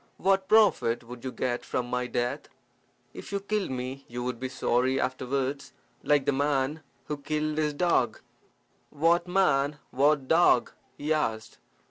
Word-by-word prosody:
"What 195 Hz, 0 st, +2 dB
profit 205 Hz, -, +4 dB
would 120 Hz, 0 st, -11 dB
you 130 Hz, -, -4 dB
get 125 Hz, -1 st, -2 dB
from 125 Hz, -, -2 dB
my 125 Hz, 0 st, -2 dB
death? 120 Hz, 0 st, -2 dB, 0.6 s
If -, -, -9 dB
you 200 Hz, -, -1 dB
killed 205 Hz, 0 st, -2 dB
me 130 Hz, +1 st, -5 dB
you 120 Hz, +1 st, -5 dB
would 125 Hz, -1 st, -3 dB
be 130 Hz, -, -3 dB
sorry 130 Hz, 0 st, +1 dB
afterwards, 130 Hz, +2 st, -2 dB, 0.3 s
like 145 Hz, -2 st, +2 dB
that 145 Hz, -, +3 dB
man 140 Hz, +2 st, 0 dB, 0.2 s
who 150 Hz, -, -4 dB
killed 150 Hz, +1 st, -2 dB
his 150 Hz, -1 st, 0 dB
dog." 175 Hz, +3 st, +1 dB, 0.7 s
"What 170 Hz, +4 st, +2 dB
man? 150 Hz, -6 st, +2 dB
What 140 Hz, 0 st, +2 dB
dog?" 165 Hz, -6 st, +4 dB, 0.3 s
he 150 Hz, +2 st, 0 dB
asked. 110 Hz, -8 st, -2 dB
140 Hz, 150 wpm, -28 LUFS, 125-155 Hz, 0.7 s, profit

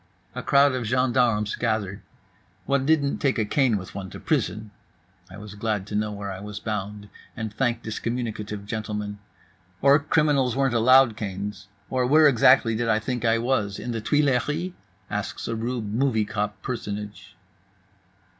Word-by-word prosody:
A -, -, -5 dB
crowd 140 Hz, 0 st, +4 dB
of 125 Hz, -3 st, -2 dB
gendarmes 120 Hz, -4 st, +2 dB
gathered. 110 Hz, -4 st, -2 dB, 0.6 s
One 140 Hz, -1 st, +1 dB
didn't 150 Hz, -3 st, +2 dB
take 135 Hz, -3 st, +1 dB
a 110 Hz, -, +1 dB
cane 125 Hz, -1 st, +2 dB
with 95 Hz, -1 st, -8 dB
one 95 Hz, -1 st, -6 dB
to -, -, -9 dB
prison 105 Hz, +3 st, -1 dB, 0.6 s
(I 95 Hz, -, -11 dB
was 105 Hz, 0 st, -9 dB
glad 105 Hz, -2 st, -2 dB
to 105 Hz, -, -6 dB
know 105 Hz, 0 st, 0 dB
where 100 Hz, -1 st, -5 dB
I 95 Hz, -, -6 dB
was 105 Hz, 0 st, -7 dB
bound, 105 Hz, -1 st, -4 dB, 0.3 s
and 110 Hz, -3 st, -4 dB
thanked 120 Hz, 0 st, -1 dB
this 110 Hz, -1 st, -4 dB
communicative 110 Hz, -4 st, -4 dB
gentleman); 105 Hz, -1 st, -4 dB, 0.6 s
or 140 Hz, +1 st, +5 dB
criminals 145 Hz, -4 st, +2 dB
weren't 135 Hz, -2 st, +1 dB
allowed 125 Hz, 0 st, +5 dB
canes; 100 Hz, -1 st, -5 dB, 0.2 s
or 125 Hz, -1 st, 0 dB
where 155 Hz, +3 st, +6 dB
exactly 125 Hz, -3 st, +5 dB
did 115 Hz, +1 st, -1 dB
I 110 Hz, -, +4 dB
think 120 Hz, +2 st, -3 dB
I 115 Hz, -1 st, +3 dB
was, 115 Hz, -4 st, 0 dB
in 120 Hz, -, -5 dB
the 115 Hz, -1 st, -3 dB
Tuileries? 150 Hz, -, +1 dB, 0.4 s
asks -, -, -4 dB
a 115 Hz, -, -2 dB
rube 115 Hz, -2 st, -3 dB
movie 115 Hz, -3 st, +1 dB
cop 105 Hz, -1 st, -3 dB
personage. 105 Hz, -4 st, -6 dB
110 Hz, 165 wpm, -25 LUFS, 105-130 Hz, 0.6 s, where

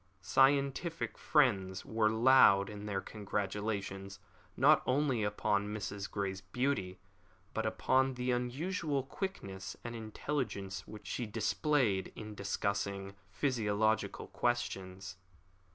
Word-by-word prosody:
Scientific 140 Hz, -, +2 dB
friends 100 Hz, -, +2 dB
were 110 Hz, -1 st, +2 dB
loud 110 Hz, -4 st, +6 dB
in 105 Hz, 0 st, -7 dB
their 100 Hz, -2 st, -1 dB
congratulations, 100 Hz, -1 st, -3 dB, 0.4 s
not -, -, +6 dB
only 130 Hz, -3 st, +2 dB
upon 105 Hz, 0 st, 0 dB
Mrs. 100 Hz, -1 st, -4 dB
Grey's 95 Hz, -1 st, -3 dB
beauty, 100 Hz, -2 st, -1 dB, 0.6 s
but 110 Hz, 0 st, -1 dB
upon 130 Hz, +4 st, +2 dB
the 125 Hz, 0 st, -1 dB
unusual 140 Hz, +4 st, -1 dB
quickness 115 Hz, -, -5 dB
and 120 Hz, 0 st, -5 dB
intelligence 110 Hz, -3 st, -3 dB
which 105 Hz, -1 st, -10 dB
she 120 Hz, -, -3 dB
displayed 115 Hz, -, +1 dB
in 110 Hz, 0 st, -7 dB
discussing 100 Hz, -1 st, -2 dB, 0.2 s
physiological 110 Hz, -5 st, 0 dB
questions. 95 Hz, -6 st, -2 dB
110 Hz, 105 wpm, -33 LUFS, 100-130 Hz, 0.6 s, loud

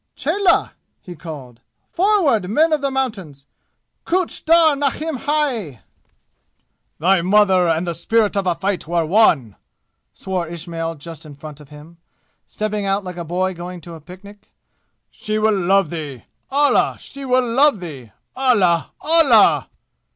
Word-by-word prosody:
"Cheloh!" 395 Hz, -3 st, +1 dB, 0.3 s
he 180 Hz, -, -11 dB
called. 145 Hz, -7 st, -10 dB, 0.3 s
"Forward, 335 Hz, -, +2 dB
men 315 Hz, +9 st, +2 dB
of 300 Hz, -, 0 dB
the 280 Hz, -, 0 dB
mountains! 200 Hz, -, -4 dB, 0.6 s
Kuch 365 Hz, 0 st, -1 dB
dar 325 Hz, -2 st, +5 dB
nahin 290 Hz, +3 st, -2 dB
hai!" 250 Hz, -, -2 dB, 1.2 s
"Thy 185 Hz, +3 st, +2 dB
mother 190 Hz, -1 st, +3 dB
and 165 Hz, +2 st, 0 dB
the 170 Hz, -, -3 dB
spirit 210 Hz, +6 st, +1 dB
of 195 Hz, -2 st, -1 dB
a 175 Hz, -, +1 dB
fight 195 Hz, -3 st, -3 dB
were 170 Hz, -1 st, 0 dB
one!" 155 Hz, -, +2 dB, 0.5 s
swore 185 Hz, -3 st, -4 dB
Ismail 165 Hz, 0 st, -5 dB
just 165 Hz, +1 st, -11 dB
in 150 Hz, -2 st, -12 dB
front 150 Hz, +1 st, -11 dB
of 145 Hz, -2 st, -16 dB
him, 150 Hz, +3 st, -14 dB, 0.5 s
stepping 210 Hz, -1 st, -3 dB
out 195 Hz, +1 st, 0 dB
like 180 Hz, -2 st, -8 dB
a 170 Hz, -, -4 dB
boy 185 Hz, +3 st, -2 dB
going 175 Hz, +1 st, -8 dB
to 170 Hz, +1 st, -11 dB
a 160 Hz, -, -11 dB
picnic. 200 Hz, +5 st, -14 dB, 0.6 s
"She 215 Hz, 0 st, -4 dB
will 215 Hz, 0 st, +2 dB
love 195 Hz, -2 st, +1 dB
thee! 150 Hz, -7 st, -6 dB, 0.3 s
Allah! 285 Hz, +1 st, +2 dB
She 275 Hz, -, -11 dB
will 255 Hz, -1 st, +1 dB
love 265 Hz, 0 st, +3 dB
thee! 140 Hz, -10 st, -9 dB, 0.2 s
Allah! 200 Hz, -11 st, +2 dB
Allah!" 300 Hz, -8 st, +4 dB
190 Hz, 145 wpm, -19 LUFS, 165-255 Hz, 1.2 s, dar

